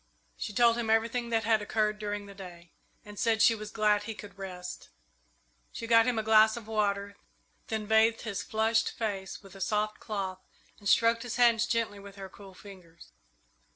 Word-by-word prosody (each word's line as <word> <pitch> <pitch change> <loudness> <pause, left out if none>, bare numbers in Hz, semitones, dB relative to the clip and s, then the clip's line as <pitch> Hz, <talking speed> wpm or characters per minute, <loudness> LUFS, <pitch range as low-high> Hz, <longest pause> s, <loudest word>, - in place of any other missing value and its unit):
She - - -5
told 235 +2 +4
him 225 -2 -2
everything 230 +2 +1
that 225 -1 +1
had 220 0 +2
occurred 210 0 0
during 205 -1 -4
the 200 - -11
day, 175 -3 -12 0.3
and 205 -1 -10
said 225 -1 +2
she 230 - +6
was 215 -1 -7
glad 210 -1 +2
he 225 0 -5
could 205 -1 -11
rest. 180 -2 -8 0.8
She 230 - -6
got 230 0 +5
him 245 -2 +1
a 220 - 0
glass 220 +1 +5
of 230 - -8
water, 200 -2 -1 0.5
then 220 -1 -3
bathed 220 +1 +3
his 205 -4 -4
flushed 225 +1 +1
face 200 -3 -4
with 195 -2 -14
a 195 - -11
soft 215 +1 -1
cloth 195 -4 -4 0.4
and 205 -2 -3
stroked 230 0 +4
his 245 -2 -5
hands 235 -1 +4
gently 230 -3 -1
with 200 0 -12
her 195 -1 -8
cool 195 -1 -14
fingers. 180 -5 -14
215 Hz, 190 wpm, -29 LUFS, 200-225 Hz, 0.8 s, she